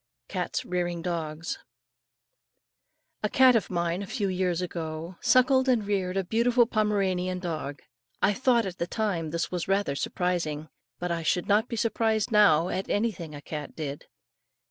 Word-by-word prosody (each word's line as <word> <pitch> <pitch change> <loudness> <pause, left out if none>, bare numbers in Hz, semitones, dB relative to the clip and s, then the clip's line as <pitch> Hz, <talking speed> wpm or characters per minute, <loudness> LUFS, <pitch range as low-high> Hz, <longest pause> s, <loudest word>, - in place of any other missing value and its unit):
CATS 180 -3 -3
REARING 175 -1 -2
DOGS. 165 -2 -3 1.6
A 210 - 0
cat 260 +2 +6
of 225 - +1
mine, 170 0 -1
a 200 - -5
few 205 0 -1
years 180 -2 0
ago, 165 -1 -4
suckled 255 +2 +4
and 235 -5 +2
reared 195 -2 -1
a 195 - +1
beautiful 235 +5 +3
Pomeranian 195 -5 0
dog. 155 -6 -5 0.4
I 205 - +3
thought 240 0 +2
at 185 -1 -6
the 170 - -1
time 185 -7 -1
this 170 +2 -2
was 180 -2 -2
rather 195 -7 +1
surprising; 160 -2 -2 0.3
but 180 +3 -3
I 170 -1 -1
should 175 +2 0
not 210 +3 +3
be 235 - -4
surprised 225 0 +1
now 180 -6 +5
at 190 - -3
anything 195 -8 -1
a 145 - -8
cat 150 -2 -6
did. 145 -2 -5
185 Hz, 160 wpm, -27 LUFS, 170-215 Hz, 1.6 s, cat